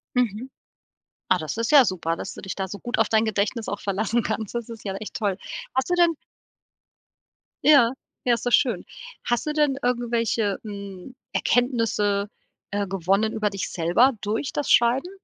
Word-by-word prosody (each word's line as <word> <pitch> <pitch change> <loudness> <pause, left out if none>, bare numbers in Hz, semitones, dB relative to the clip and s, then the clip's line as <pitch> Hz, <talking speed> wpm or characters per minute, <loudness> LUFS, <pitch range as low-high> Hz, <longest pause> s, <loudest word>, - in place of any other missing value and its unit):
Mhm. 245 +1 0 0.8
Ah, 185 - +5
das 155 -2 -4
ist 230 +3 -1
ja 280 -4 +8
super, 170 -3 -1
dass 195 - -6
du - - -10
dich 190 - -5
da 190 -1 -3
so 200 - -7
gut 240 - -3
auf 225 - +4
dein 220 0 +3
Gedächtnis 220 +1 -1
auch 205 - -3
verlassen 215 +4 0
kannst. 220 -1 -3
Das 235 -1 -3
ist 230 -2 -9
ja 195 -2 -3
echt 210 +2 -7
toll. 200 -4 -1 0.4
Hast 260 +5 0
du - - +2
denn 340 -2 +4 1.5
Ja? 275 -6 +6 0.3
Ja, 245 - +4
ist 230 - -7
doch 245 - 0
schön. 235 -10 +2 0.4
Hast 240 +3 0
du 300 - -1
denn 295 -3 +2
irgendwelche, 235 -4 0
hm, 200 +2 -8 0.2
Erkenntnisse, 215 -5 +1 0.4
äh, 205 0 -1
gewonnen 195 +4 +1
über 215 -1 0
dich 195 0 -4
selber 180 +11 +3
durch 215 +6 -2
das 290 - -2
Schreiben? 250 +9 +4
220 Hz, 175 wpm, -24 LUFS, 200-245 Hz, 1.5 s, ja